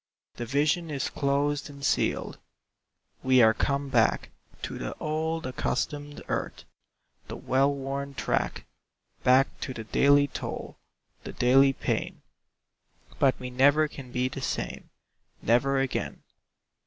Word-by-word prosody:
The 120 - -4
vision 150 +6 +1
is 140 -2 -2
closed 145 +1 0
and 140 -1 -7
sealed. - - 0 0.8
We 130 0 +4
are 110 0 +6
come 140 +3 -1
back 115 -4 +2 0.3
To - - -5
the - - -4
old, 160 +1 -2
accustomed 145 +3 -3
earth, - - -3 0.6
The - - -6
well 135 +2 +2
worn 140 0 -4
track, 110 - -1 0.6
Back 130 +2 +4
to 130 - -5
the 110 - -5
daily 140 +5 +4
toil, 130 - -6 0.4
The - - -7
daily 135 +2 +5
pain, - - -3 1.0
But 135 -2 +3
we 125 0 -6
never 145 +4 +4
can 135 -4 -10
be 125 +1 0
the 130 - -6
same, - - -4 0.5
Never 135 +4 +3
again. 135 -1 -3
140 Hz, 130 wpm, -27 LUFS, 130-145 Hz, 1.0 s, are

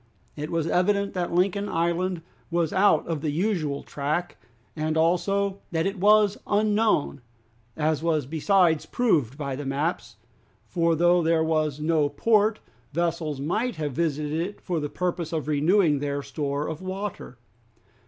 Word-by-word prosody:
It 150 +1 -5
was 165 -2 -1
evident 200 +4 +1
that 180 -2 -2
Lincoln 195 +3 +1
Island 170 +1 -1 0.3
was 170 -2 0
out 200 +2 +4
of 160 -4 -3
the 155 - -1
usual 155 -4 -1
track, 150 +5 -3 0.4
and 155 0 -1
also 190 +4 +1
that 165 0 0
it 195 0 -2
was 210 +1 +4
unknown, 210 - +1 0.6
as 155 -1 0
was 160 -4 0
besides 165 +2 +2
proved 150 - +1
by 140 -3 -3
the 145 - -5
maps, 140 -3 -2 0.5
for 170 -2 +1
though 175 +2 +4
there 165 0 +2
was 155 -3 0
no 155 -1 +1
port, 215 +7 +2 0.3
vessels 165 -2 -1
might 215 - -1
have 150 -2 -3
visited 150 -1 -1
it 200 +4 -5
for 175 -3 -2
the 150 -1 -3
purpose 175 -2 -3
of 155 -3 -3
renewing 155 +1 +3
their 140 0 -2
store 145 0 -3
of 160 +1 -5
water. 190 - -6
165 Hz, 150 wpm, -25 LUFS, 150-185 Hz, 0.6 s, out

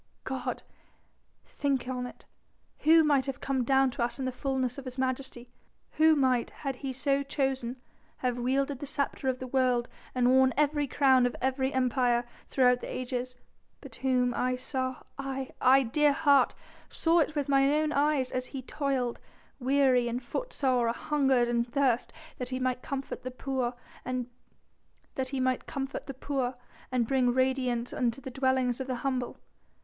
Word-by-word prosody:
God - - -4 0.8
think 275 -3 -1
on 250 -1 -3
it! - - -13 0.5
who 320 +1 +6
might 280 -3 +2
have 270 - -4
come 265 -2 -1
down 265 +1 +3
to 240 - -5
us 240 - -2
in 265 - -3
the 260 - -1
fullness 260 -1 -2
of 275 - -10
His 255 0 -6
Majesty, 255 -2 -3 0.4
Who 315 0 +5
might, 255 -4 +2
had 275 -3 -5
He 270 0 -4
so 275 +2 +1
chosen, 265 -3 -2 0.4
have 245 -1 -1
wielded 270 +2 0
the 290 - -5
sceptre 280 -1 -2
of 255 - -1
the 255 - -6
world 250 -2 +1 0.3
and 250 -1 +3
worn 260 0 +4
every 295 -1 +2
crown 260 -2 +4
of 245 - -5
every 265 +1 0
empire 250 -2 +1 0.2
throughout 250 -2 +3
the - - -6
ages, 255 0 -4 0.4
but - - -12
Whom 250 -2 +1
I 255 +1 0
saw 260 0 -3 0.2
aye, 270 -1 -4
I, 265 +2 +6
dear 290 +5 +3
heart 280 -3 +4 0.3
saw 330 0 +3
with 290 -2 -1
mine 275 -1 +4
own 305 +1 +2
eyes 285 -3 +1
as 255 0 -2
He 270 -2 -7
toiled, 265 -3 -2 0.4
weary, 255 -2 +3
footsore, 255 - -1
anhungered, 265 -2 +2
and 235 0 0
athirst, 250 -1 +1 0.3
that 250 -1 -4
He 255 - -2
might 255 -1 -1
comfort 275 -2 -5
the 255 - -5
poor 255 -1 -2 0.3
and 255 -1 -2 2.8
bring 250 0 +2
radiance 255 -2 0
into 240 0 0
the 265 -1 -8
dwellings 260 -1 +1
of 265 - -4
the 255 - -1
humble. 255 -1 -2
260 Hz, 155 wpm, -29 LUFS, 250-275 Hz, 2.8 s, who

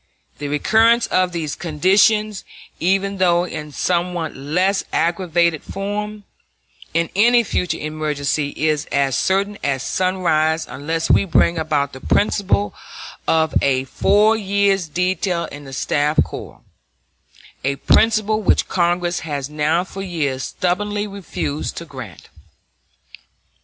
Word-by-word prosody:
The 145 - -4
recurrence 225 +11 +3
of 185 -1 +1
these 160 -4 -3
conditions, 195 +5 +2 0.4
even 195 +2 +1
though 175 -2 +3
in 150 -4 -6
somewhat 175 0 -1
less 180 +8 0
aggravated 170 -2 +1
form, 205 +1 -5 0.7
in 165 0 0
any 235 +4 +5
future 180 -4 -1
emergency 150 -1 -2
is 155 -1 0
as 140 -2 +1
certain 200 +5 0
as 135 -2 -1
sunrise 165 -4 +1
unless 160 +6 -2
we - - +5
bring 170 -2 +2
about 150 -3 -1
the 130 - -10
principle 105 - +1 0.5
of 160 -1 +2
a 130 -2 +2
four 210 +10 +3
years' 200 -3 +1
detail 180 +1 -1
in 145 0 -9
the 135 - -10
staff 145 +3 0
corps - - -9 1.0
a 135 +1 0
principle 215 +7 +2
which 205 - +2
Congress 175 0 0
has 145 -3 -4
now 155 +3 +1
for 195 +1 -8
years 150 -8 -2
stubbornly 205 +3 -1
refused 195 -7 -4
to 170 - -6
grant. 130 - -10
170 Hz, 120 wpm, -20 LUFS, 150-195 Hz, 1.0 s, any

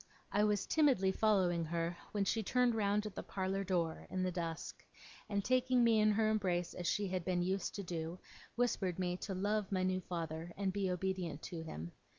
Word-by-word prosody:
I 205 - +3
was 210 -2 +2
timidly 265 -12 +3
following 190 -5 +2
her, 170 +1 -1 0.2
when 205 -2 0
she 225 - +1
turned 250 +3 +2
round 210 -1 +1
at 210 - -5
the - - -4
parlour 195 0 -2
door, 170 -4 -1
in 185 0 -1
the 185 - 0
dusk, 165 -2 -4 0.5
and 200 -2 -1
taking 255 -1 +3
me 230 -2 +5
in 215 0 +5
her 215 +1 +3
embrace 185 -5 0
as 175 -1 -4
she 205 +3 +1
had 185 -1 -1
been 175 0 +1
used 190 +1 -1
to 200 - -4
do, 170 -1 -4 0.4
whispered 205 -7 0
me 180 -1 0
to 195 0 -4
love 205 +2 0
my 185 -1 +1
new 185 0 +1
father 165 -1 -4
and 195 -1 0
be 195 -1 0
obedient 180 -4 -2
to 170 -2 -5
him. 85 - -6
190 Hz, 200 wpm, -36 LUFS, 175-210 Hz, 0.5 s, me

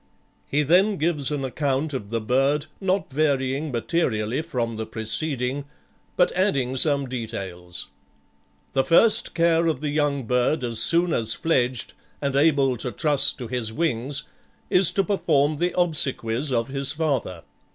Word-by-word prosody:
He 150 +2 +1
then 190 +7 +3
gives 155 -4 -1
an 145 -3 -3
account 140 +2 -2
of 105 -6 -5
the 115 +1 -1
bird, 135 +6 +1
not 190 -5 -1
varying 140 0 0
materially 120 -2 -1
from 125 -8 -3
the 110 0 -5
preceding, 125 +4 -2 0.5
but 180 - +3
adding 140 -10 0
some 140 0 +3
details. 95 -8 -5 0.9
"The 135 - +2
first 220 - +5
care 170 -1 +2
of 155 -5 0
the 150 -1 -2
young 145 -2 0
bird 125 +5 0
as 115 -2 0
soon 170 0 +3
as 110 -1 +1
fledged, 130 -6 -1 0.3
and 140 -1 -2
able 140 -3 +3
to 125 +2 -4
trust 150 -1 +2
to 125 - -7
his 115 -2 -2
wings, 140 0 -1 0.5
is 180 -2 +6
to 195 - +2
perform 155 -7 +1
the 175 +3 0
obsequies 140 -6 0
of 115 0 -1
his 135 0 0
father. 135 - -2
140 Hz, 150 wpm, -23 LUFS, 125-160 Hz, 0.9 s, is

